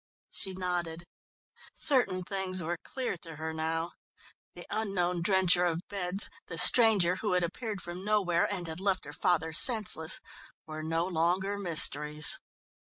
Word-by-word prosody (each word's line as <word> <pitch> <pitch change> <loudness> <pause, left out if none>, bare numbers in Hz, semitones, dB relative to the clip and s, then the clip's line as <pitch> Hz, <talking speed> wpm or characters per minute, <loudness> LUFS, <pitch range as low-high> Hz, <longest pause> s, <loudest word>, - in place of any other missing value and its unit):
She 190 -2 -2
nodded. 175 -2 -4 0.7
Certain 245 -10 +2
things 185 -1 -3
were 170 +1 -4
clear 255 -7 -5
to 165 -1 -11
her 160 +1 -6
now; 165 +1 -3 0.6
the - - -10
unknown 185 -5 -2
drencher 180 -1 +2
of 170 -1 -1
beds, 195 0 +3 0.2
the - - -7
stranger 205 -7 +6
who 205 -2 -2
had 180 -1 +1
appeared 205 +3 -5
from 175 +2 -8
nowhere 195 -5 0
and 185 -4 -3
had 160 0 -7
left 190 -1 -2
her 145 - -10
father 160 -1 -1
senseless, 215 - +3 0.5
were 155 0 -8
no 165 +2 -2
longer 185 +3 -1
mysteries. 150 -5 +3
180 Hz, 145 wpm, -29 LUFS, 165-195 Hz, 0.7 s, stranger